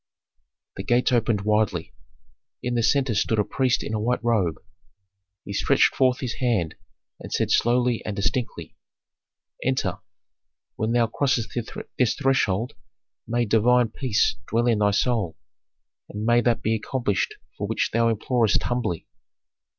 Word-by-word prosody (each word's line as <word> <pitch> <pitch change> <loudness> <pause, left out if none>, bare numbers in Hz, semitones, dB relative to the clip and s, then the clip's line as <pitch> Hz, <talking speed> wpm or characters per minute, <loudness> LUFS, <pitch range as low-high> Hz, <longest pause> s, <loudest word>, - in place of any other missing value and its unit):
The - - -4
gates 120 +2 +2
opened 115 -4 +2
widely. 105 -5 0 0.7
In 125 - -1
the 120 - +1
centre 130 +1 +2
stood 110 +2 +1
a 105 - +3
priest 130 +3 0
in - - -5
a 110 - 0
white 120 +3 -1
robe; 105 -9 +1 0.9
he 100 - -6
stretched - - +3
forth 130 -1 +2
his 125 -2 -3
hand, 110 -11 0 0.5
and - - -10
said - - 0
slowly 120 0 +2
and 105 - -4
distinctly, 115 +4 -3 0.9
"Enter. 130 0 -1 0.8
When 110 +1 -1
thou 120 -1 +4
crossest 120 0 -1 0.5
this 125 -4 +3
threshold, 125 -6 +1 0.5
may 120 +1 +1
divine 115 +2 +3
peace 110 -3 0
dwell 115 +1 +1
in 115 -3 +2
thy 105 -1 +3
soul, 105 -5 0 0.7
and 105 +1 -5
may 120 +1 +4
that 120 -1 +1
be 110 - +1
accomplished 110 -2 -1 0.2
for - - -4
which - - -1
thou 115 0 +3
implorest 115 0 +1
humbly." 120 -9 -2
115 Hz, 145 wpm, -24 LUFS, 105-125 Hz, 0.9 s, thou